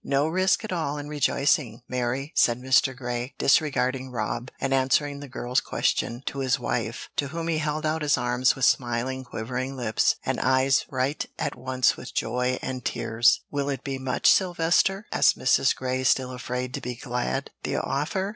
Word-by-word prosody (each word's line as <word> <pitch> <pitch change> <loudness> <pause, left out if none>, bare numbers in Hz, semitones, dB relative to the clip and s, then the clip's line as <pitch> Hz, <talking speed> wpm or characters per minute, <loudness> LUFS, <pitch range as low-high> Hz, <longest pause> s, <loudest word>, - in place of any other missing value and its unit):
"No 140 +2 +1
risk 185 +6 +2
at 220 - -4
all 150 -4 -2
in 145 0 -6
rejoicing, 140 -4 +1
Mary," 125 +4 -2
said 120 0 +3
Mr. 130 0 +2
Grey, 120 0 -4
disregarding 130 -3 +2
Rob, 120 +1 -3
and 135 - -1
answering 140 +2 +1
the 145 - -8
girl's 125 0 -1
question 120 +3 -1
to 140 - -4
his 130 -2 +1
wife, - - -3
to 145 - 0
whom 165 +4 -4
he 160 -2 0
held 155 0 -2
out 155 +1 0
his 150 -1 +2
arms 125 +1 +2
with 135 - +1
smiling, 125 +1 0
quivering 125 +3 -4
lips, 110 -4 +2
and - - -1
eyes 130 +1 +3
bright 135 +2 -1
at 145 -2 -2
once 130 -1 +1
with - - -10
joy 125 +2 0
and 130 -2 -4
tears. 115 +1 +2
"Will 145 -1 -1
it 135 -2 -3
be 135 -2 -4
much, 130 -1 0
Sylvester?" 185 +2 +2
asked - - +4
Mrs. - - +3
Grey, 130 0 -2
still 130 0 +2
afraid 125 0 -4
to - - -4
be 125 0 -4
glad. 125 +2 -3
"The - - -2
offer? 190 +7 -1
130 Hz, 180 wpm, -26 LUFS, 125-145 Hz, -, asked